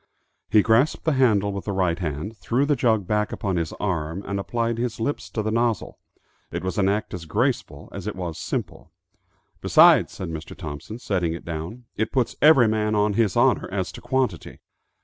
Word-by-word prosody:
He 105 - +5
grasped 115 +7 +2
the 160 - +3
handle 110 -7 +3
with 100 - -5
the 100 - -2
right 90 -3 0
hand, 85 +6 -4
threw 115 +8 0
the 145 0 +2
jug 110 -5 +1
back 105 +2 0
upon 95 -3 -2
his 85 -2 -2
arm, 85 -1 -3
and 100 0 -2
applied 115 +3 -2
his 120 -1 -2
lips 145 +6 -2
to 110 - -3
the 110 - -1
nozzle. 115 -3 -1 0.5
It - - -5
was 95 +3 -2
an 95 -1 +3
act 105 +2 -2
as 90 -3 -6
graceful 120 - -1
as - - -7
it - - -3
was 85 -4 -5
simple. - - -4 0.7
"Besides," - - +6
said 95 - -6
Mr. 80 -1 -7
Thompson, 80 +6 -7
setting 90 -8 -1
it 85 - -8
down, 85 +9 -6
"it 110 - -1
puts 130 -4 0
every 145 -6 +7
man 110 0 0
on 105 0 +2
his 105 -2 +1
honor 125 +2 +3
as 95 -2 -2
to - - -11
quantity." 125 - -2
105 Hz, 195 wpm, -24 LUFS, 90-115 Hz, 0.7 s, every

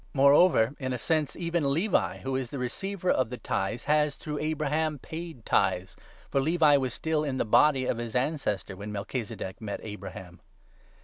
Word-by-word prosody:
Moreover, 140 -2 +5
in 130 -2 -2
a - - -1
sense, 155 +3 0
even 170 -5 0
Levi, 175 +8 +1
who 130 0 -2
is 130 -2 -2
the 140 - -5
receiver 185 +9 -2
of 130 -4 +1
the 125 - -4
9 - - -16
tithes, 115 0 -2
has, 150 -1 +2
through 150 0 -5
Abraham, 155 0 0
paid 160 -4 -8
tithes; 95 -1 +1 0.4
for 135 - +2
Levi 155 0 +4
was 130 -2 -1
still 160 -1 -1
10 150 - -1
in 130 - -2
the - - 0
body 130 +4 +4
of 120 - -1
his 120 -1 -5
ancestor 125 -8 -1
when 100 +2 -7
Melchizedek 105 -1 -5
met 105 -2 -4
Abraham. 95 -4 -8
135 Hz, 185 wpm, -28 LUFS, 115-155 Hz, 0.4 s, Moreover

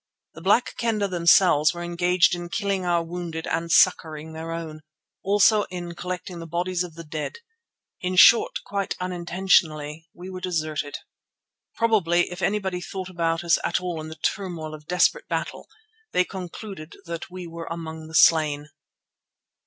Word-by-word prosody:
The 165 - -11
Black 205 +7 +2
Kendah 220 -4 0
themselves 170 -2 +4
were 175 - -5
engaged 175 +1 +2
in 175 0 -4
killing 195 -1 -1
our 170 -1 +2
wounded 165 -1 -5
and 165 +1 -2
succouring 160 -2 +3
their 160 +1 -6
own; 160 -2 -6 0.4
also 205 +2 +4
in 175 -1 -6
collecting 180 0 -6
the 165 - -7
bodies 175 +2 -1
of 170 -3 -9
the 170 - -8
dead. 155 - -5 0.6
In 185 0 -2
short, 465 - +6
quite 200 -1 -2
unintentionally, 170 -4 0
we 180 +1 -11
were 185 0 -7
deserted. 155 -5 -2 0.8
Probably, 175 -7 +2
if 180 +1 -7
anybody 190 -3 -1
thought 185 +1 -6
about 165 -2 -1
us 170 -1 +3
at - - +1
all 175 -3 -4
in 155 - -7
the 160 - -8
turmoil 170 -4 -3
of 150 0 -11
desperate 180 - +2
battle, - - -4 0.5
they 180 - +3
concluded 185 -3 -8
that 170 0 -6
we 185 0 -8
were 165 0 -8
among 160 -1 -6
the 160 - -8
slain. 150 -3 +4
175 Hz, 155 wpm, -24 LUFS, 160-185 Hz, 0.8 s, short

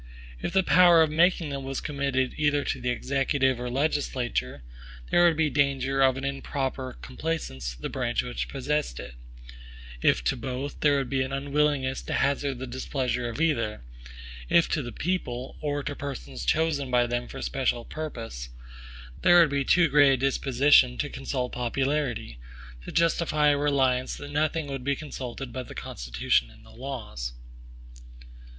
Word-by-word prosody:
If - - -2
the 190 0 +4
power 175 -3 +6
of 155 - -1
making 170 0 +3
them 140 -1 -4
was 135 0 -3
committed 140 -3 -1
either 145 -1 +1
to 130 - -3
the 125 - -1
Executive 135 0 +1
or 125 0 -3
legislature, 130 - -1 0.5
there 175 - +5
would 165 -3 +4
be 155 -2 +2
danger 135 -1 +1
of 130 -1 +4
an 135 - -5
improper 135 -1 -3
complaisance 125 - -4
to - - -17
the - - -1
branch 125 -3 -1
which 125 0 -4
possessed 140 - -2
it; 60 0 -8 0.9
if - - +3
to - - +1
both, 130 +4 -5
there 145 -1 +3
would 135 -2 -1
be 135 -1 +1
an 130 +1 -2
unwillingness 140 -1 0
to - - -5
hazard 140 -1 0
the 130 - -5
displeasure 125 -1 -2
of 115 - -6
either; 115 - 0 0.7
if 170 - +5
to 155 - 0
the 120 -2 -6
people, 130 -5 -3
or 145 -1 -2
to 145 - -4
persons 70 - -6
chosen 150 - +1
by 125 -1 +3
them 120 0 -2
for - - -9
the - - -5
special 125 -3 -1
purpose, 115 - -6 0.7
there 175 - +7
would 165 -4 +5
be 140 -1 +1
too 170 +5 +4
great 145 -1 +5
a - - +1
disposition 135 -1 +4
to 145 - -2
consult 130 -2 -3
popularity, 125 - -2 0.4
to - - -7
justify 165 -3 +2
a 145 - +4
reliance 135 -3 +1
that 145 0 -8
nothing 155 +1 0
would 135 -2 -5
be 140 +1 +1
consulted 130 -3 -7
but 130 -1 -5
the - - -10
Constitution - - -1
and - - -18
the - - -16
laws. 110 - -6
135 Hz, 170 wpm, -27 LUFS, 125-145 Hz, 0.9 s, there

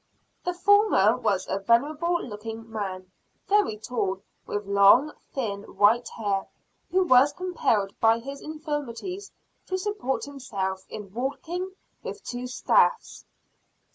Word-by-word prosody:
The 360 0 -2
former 380 - +5
was 215 -6 0
a 195 - -1
venerable 300 - +2
looking 225 +1 -7
man, 190 -4 -5 0.4
very 410 - +2
tall, 200 -4 -2 0.2
with 205 0 -3
long, 200 +9 +6 0.2
thin 210 -7 -3 0.2
white 225 +4 +4
hair, 200 -3 -2 0.4
who 375 +1 +3
was 270 -3 +5
compelled 230 - 0
by 225 0 +5
his 275 +4 -8
infirmities 305 - -5 0.4
to 375 - -1
support 375 -9 -2
himself 200 -9 -4
in 205 -3 -8
walking 340 - -4 0.3
with - - -7
two 245 0 -5
staffs. 455 - +1
245 Hz, 120 wpm, -26 LUFS, 205-335 Hz, 0.4 s, long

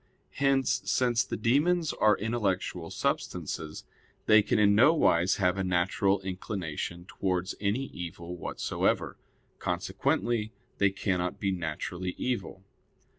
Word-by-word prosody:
Hence, 135 -2 +2
since 120 -1 +2
the - - -4
demons 150 +9 +2
are 105 -2 +3
intellectual 95 -6 -2
substances, 80 -2 -3 0.4
they 110 0 +7
can 105 - 0
in 100 -1 +5
no 130 +10 +6
wise 90 - +3
have 90 0 +1
a - - +1
natural 95 +2 +1
inclination 90 -3 -4
towards 95 -1 -2
any 105 +6 0
evil 85 -4 -7
whatsoever; 90 - -1 0.4
consequently 115 -2 -1 0.3
they 100 - +5
cannot 90 -2 -2
be 100 - 0
naturally 90 +1 -4
evil. 120 -6 -3
95 Hz, 120 wpm, -29 LUFS, 90-115 Hz, 0.4 s, they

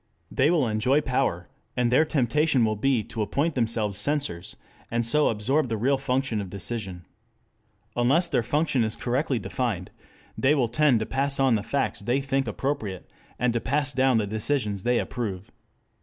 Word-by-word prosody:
They 135 +3 +3
will 160 -7 +2
enjoy 125 +7 +2
power, 125 - -1 0.3
and 120 -1 +2
their 145 +6 +5
temptation 145 -1 +2
will 110 0 0
be 125 +1 +1
to 110 - -5
appoint 145 +9 0
themselves 110 -5 0
censors, 140 - -2 0.3
and 120 0 0
so 150 +6 +2
absorb 125 +6 0
the 110 - -1
real 135 +5 +1
function 130 -4 -1
of 95 - -7
decision. 95 -3 -4 0.9
Unless 140 +9 +3
their - - +2
function 140 +1 +1
is 110 0 -2
correctly 130 +2 -1
defined 110 -7 -3 0.4
they 135 +3 +3
will 125 -5 +1
tend 130 -2 +3
to - - -1
pass 135 +3 -1
on 135 -2 +4
the 110 - +1
facts 135 +6 -1
they 120 +6 0
think 135 -1 -1
appropriate, 110 -5 -3 0.3
and 125 -1 +1
to 120 - -1
pass 140 +2 0
down 130 -2 +3
the 110 - +1
decisions 105 -1 -1
they 120 +4 +1
approve. 100 -8 -4
125 Hz, 170 wpm, -26 LUFS, 110-140 Hz, 0.9 s, their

